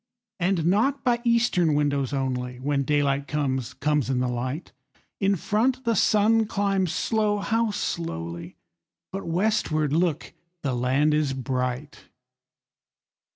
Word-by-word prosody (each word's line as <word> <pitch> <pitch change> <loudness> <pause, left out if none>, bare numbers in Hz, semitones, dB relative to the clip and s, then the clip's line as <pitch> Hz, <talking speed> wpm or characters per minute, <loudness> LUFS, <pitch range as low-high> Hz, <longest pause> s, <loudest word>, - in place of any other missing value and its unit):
And 180 -2 +1
not 255 +10 +2
by 240 -2 +2
eastern 230 - +2
windows 145 -3 0
only, 125 -2 -2
When 140 +1 0
daylight 140 -1 +1
comes, 135 -5 -2
comes 150 -2 0
in 130 - +1
the 125 - 0
light; 125 +6 -4 0.5
In 195 0 +2
front 240 +8 0
the 230 -1 +2
sun 215 +2 +3
climbs 195 -4 0
slow, 215 -2 +1
how 225 +3 0
slowly! 85 - -4 0.6
But 195 -1 -5
westward, 165 -5 +1
look, 165 -2 0 0.3
the 135 -3 0
land 130 +5 +2
is 150 -3 +1
bright! 130 +2 -3
155 Hz, 125 wpm, -25 LUFS, 135-205 Hz, 0.6 s, sun